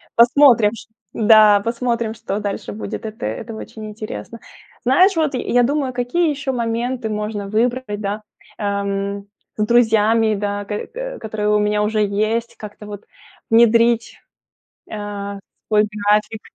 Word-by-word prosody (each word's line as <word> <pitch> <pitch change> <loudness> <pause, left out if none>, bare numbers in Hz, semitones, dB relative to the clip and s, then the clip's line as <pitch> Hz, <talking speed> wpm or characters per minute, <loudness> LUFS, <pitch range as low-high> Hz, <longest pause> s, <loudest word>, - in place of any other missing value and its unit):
Посмотрим, 235 -3 +5
ч 225 - -10 0.3
да, 215 -2 +6
посмотрим, 235 0 -2
что 210 -2 -4
дальше 200 - -4
будет. 105 - -6
Это 215 - -7
это 165 - -5
очень 220 0 -9
интересно. 215 - -8 0.5
Знаешь, 360 +10 +4
вот 315 -3 0
я 245 -1 +1
думаю, 275 +1 0
какие 255 +8 0
еще 275 -2 -2
моменты 235 0 -2
можно 210 -1 -3
выбрать, 225 0 -1
да, 205 +1 -3 0.4
эм. 200 0 -2 0.3
С 210 - 0
друзьями, 225 -1 +3
да, 205 0 -3
к 210 +1 -5
к - - -6
которые 210 -1 -3
у - - +3
меня 210 0 +1
уже 215 0 0
есть, 215 +3 -1
как-то 210 0 -10
вот 205 -1 -8 0.5
внедрить, 230 0 +3 0.7
э, - - -6
в 200 -1 -5 0.3
свой 210 -1 +4 0.3
график. 210 +1 +2
220 Hz, 140 wpm, -19 LUFS, 205-235 Hz, 0.7 s, да